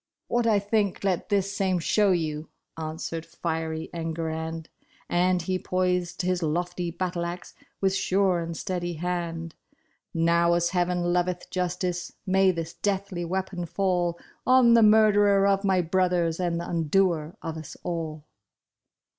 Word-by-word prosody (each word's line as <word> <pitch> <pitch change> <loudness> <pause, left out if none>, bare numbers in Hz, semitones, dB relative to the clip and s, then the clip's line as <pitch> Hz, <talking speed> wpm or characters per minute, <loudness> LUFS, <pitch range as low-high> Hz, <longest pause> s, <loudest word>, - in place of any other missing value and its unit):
*' - - -61
What 240 -1 +2
I 215 -2 +4
think 205 -1 0
let 190 -1 0
this 200 -1 0
same 190 -2 +1
show 200 +4 +2
you," 155 -3 -1 0.3
answered 160 +1 -4
fiery 160 -1 -3
Enguerrand, 160 -1 -4 0.4
And 180 0 +2
he 185 +1 -1
poised 180 -1 -1
his 180 0 0
lofty 175 +2 -1
battle 175 0 -3
axe 175 +1 -6 0.3
with 190 -1 +2
sure 190 -2 +2
and 165 -1 -4
steady 175 -2 -3
hand; 170 -1 -3 0.3
" - - -41 0.2
Now 170 +1 +3
as 170 0 +1
heaven 175 -1 +1
loveth 180 0 -1
justice, 180 -1 -2
may 190 0 +4
this 165 -2 -2
deathly 195 -3 -2
weapon 185 0 -3
fall 175 -2 0 0.3
On 255 -2 +6
the 230 - +6
murderer 205 -2 +5
of 195 0 +2
my 190 -2 +3
brothers 175 -1 +1
and 175 -2 0
th' - - -3
undoer 165 -1 +1
of 165 -1 -4
us 160 -2 -8
all 160 -3 -4
175 Hz, 145 wpm, -26 LUFS, 165-190 Hz, 0.4 s, On